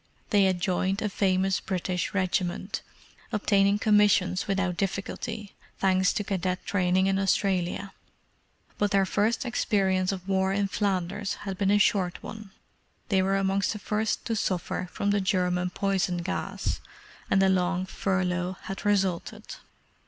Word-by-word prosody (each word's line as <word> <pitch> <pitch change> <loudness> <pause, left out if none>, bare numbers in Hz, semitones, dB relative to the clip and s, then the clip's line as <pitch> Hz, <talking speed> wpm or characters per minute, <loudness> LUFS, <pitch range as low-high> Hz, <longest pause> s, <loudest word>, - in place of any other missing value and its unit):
They 200 -2 +5
had 185 -2 +1
joined 190 +2 0
a 210 - 0
famous 190 -1 +1
British 180 -1 -2
regiment, 185 0 -1 0.5
obtaining 200 -2 +3
commissions 205 -3 +3
without 190 -2 0
difficulty, 200 +3 -4 0.2
thanks 190 -1 +3
to 210 - -1
cadet 185 -2 -2
training 185 -1 +2
in 195 0 +2
Australia. 195 0 0 0.9
But 205 - +2
their 195 -1 +3
first 220 +7 0
experience 190 -6 +1
of 185 -1 -6
war 190 0 +1
in 200 0 0
Flanders 200 0 -1
had 195 -1 -3
been 195 +1 0
a 205 - +5
short 190 -4 +1
one: 215 -2 -8 0.6
they 190 -3 +3
were 195 +1 +1
amongst 195 +1 +1
the - - -5
first 215 +1 -1
to 230 - -1
suffer 185 -2 -2
from 200 +2 0
the 205 0 +2
German 180 -2 +1
poison 190 -1 0
gas, 190 - -3 0.5
and 195 - +4
a 190 - +4
long 185 0 +1
furlough 185 -1 -1
had 195 - -6
resulted. 195 -4 0
195 Hz, 145 wpm, -27 LUFS, 185-200 Hz, 0.9 s, They